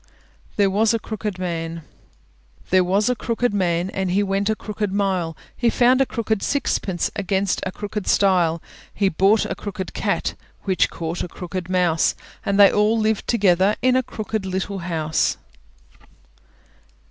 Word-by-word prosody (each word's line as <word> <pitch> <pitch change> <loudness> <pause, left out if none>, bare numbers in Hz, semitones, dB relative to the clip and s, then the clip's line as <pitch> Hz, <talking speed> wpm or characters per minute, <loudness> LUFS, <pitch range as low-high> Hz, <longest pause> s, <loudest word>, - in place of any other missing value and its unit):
THERE 200 -1 +3
WAS 220 +3 +3
A - - -1
CROOKED 210 -3 -5
MAN 165 -2 -4 0.9
There 185 0 +5
was 195 +5 +1
a 250 - +3
crooked 235 -1 -1
man, 180 -1 0
and 190 -1 -2
he 195 +3 +2
went 200 +1 0
a 220 - +2
crooked 210 -2 -4
mile, 190 -5 -1 0.2
He 240 - +2
found 250 +3 +4
a 270 - +3
crooked 220 -3 -2
sixpence 200 -10 -1
against 195 -1 0
a - - -3
crooked 205 +1 -5
stile: 175 -5 +3 0.3
He 195 -1 +2
bought 195 +5 +3
a - - -2
crooked 190 -2 -6
cat, - - -1 0.3
which 190 -2 +2
caught 165 +1 -4
a - - -4
crooked 180 0 -6
mouse, 180 -3 +2 0.3
And 200 0 0
they 200 - +8
all 210 +2 +2
lived 220 -1 0
together 195 -3 +3
in 255 0 +4
a 260 - +4
crooked 220 -3 -4
little 190 +1 -3
house. 160 -3 0
195 Hz, 160 wpm, -22 LUFS, 180-215 Hz, 0.9 s, they